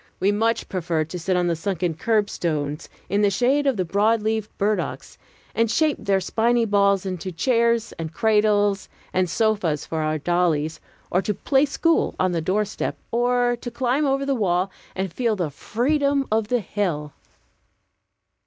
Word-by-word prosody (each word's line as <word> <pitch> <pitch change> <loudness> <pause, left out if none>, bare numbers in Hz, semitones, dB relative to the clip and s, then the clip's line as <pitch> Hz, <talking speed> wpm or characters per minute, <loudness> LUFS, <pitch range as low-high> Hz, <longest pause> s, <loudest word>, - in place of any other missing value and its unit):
We 195 +2 +3
much 225 +3 0
preferred 165 -4 -2
to 180 - -4
sit 180 +2 0
on 180 - +1
the 170 -1 +1
sunken 175 0 -2
curbstones, 165 -6 -1 0.2
in 200 +3 +1
the 205 - +4
shade 260 +8 +2
of 265 -5 +2
the 185 - 0
broad 210 +5 +2
leaved 220 -1 -1
burdocks, 210 +1 -2 0.4
and 230 0 +1
shape 305 +5 +2
their 200 -2 +1
spiny 230 +5 +1
balls 200 -2 +2
into 185 -1 -4
chairs 235 +4 +1
and 160 -1 -4
cradles 210 -1 +2 0.2
and 185 -1 +1
sofas 205 -8 0
for 160 -1 -3
our 155 0 0
dollies, 165 -1 0 0.3
or 180 - +2
to 210 +1 -2
"play 270 +6 +2
school" 330 +3 +1
on 185 0 +2
the 170 -2 -1
doorsteps, 205 +5 -1
or 245 +1 +2
to 240 - -4
climb 255 +4 0
over 275 0 +1
the 275 - +1
wall, 190 -5 0 0.2
and 190 -1 -2
to - - -25
feel 235 -4 +1
the 175 -6 -2
freedom 280 - 0
of 220 -1 +1
the 245 +1 +1
hill. 170 -7 -2
205 Hz, 170 wpm, -23 LUFS, 175-230 Hz, 0.4 s, the